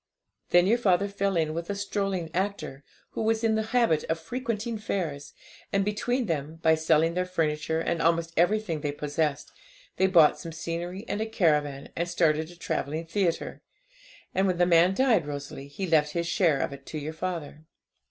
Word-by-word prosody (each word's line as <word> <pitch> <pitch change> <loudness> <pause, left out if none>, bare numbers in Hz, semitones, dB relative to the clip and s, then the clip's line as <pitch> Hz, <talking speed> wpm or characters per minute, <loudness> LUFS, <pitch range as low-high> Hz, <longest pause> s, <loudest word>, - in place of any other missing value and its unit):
'Then 175 0 +5
your 230 +5 +3
father 200 -3 +3
fell 200 -2 -1
in 155 -1 0
with 170 +2 -5
a 200 - -1
strolling 195 -4 -2
actor, 185 -7 -3 0.3
who - - -4
was 225 +1 +1
in 225 -1 +3
the 220 0 0
habit 230 -11 +2
of 165 0 -1
frequenting 230 +4 -3
fairs, 160 -9 -3 0.4
and 195 0 +1
between 245 +5 0
them, 155 -3 -3
by 160 - +5
selling 160 +1 +3
their 180 +1 0
furniture, 160 -3 -1
and 165 0 -1
almost 165 0 +1
everything 175 -2 +1
they 145 -1 -1
possessed, 145 0 -2 0.5
they 190 - +4
bought 165 -5 +5
some 165 - -7
scenery 170 +5 -5
and 210 - -2
a 220 - -1
caravan, 150 -9 +1
and 170 +1 -2
started 160 -2 +1
a 175 - -12
travelling 160 -1 -3
theatre. 170 0 -1 0.7
And 190 +1 +2
when 180 -2 0
the 175 - +4
man 175 +2 +4
died, 225 - +3
Rosalie, 140 -1 -6
he 145 +7 -5
left 150 -3 +2
his 170 0 -1
share 165 -5 +2
of - - -2
it 140 -1 -12
to 155 - -5
your 155 +1 -5
father. 160 -3 -5
170 Hz, 185 wpm, -27 LUFS, 155-200 Hz, 0.7 s, Then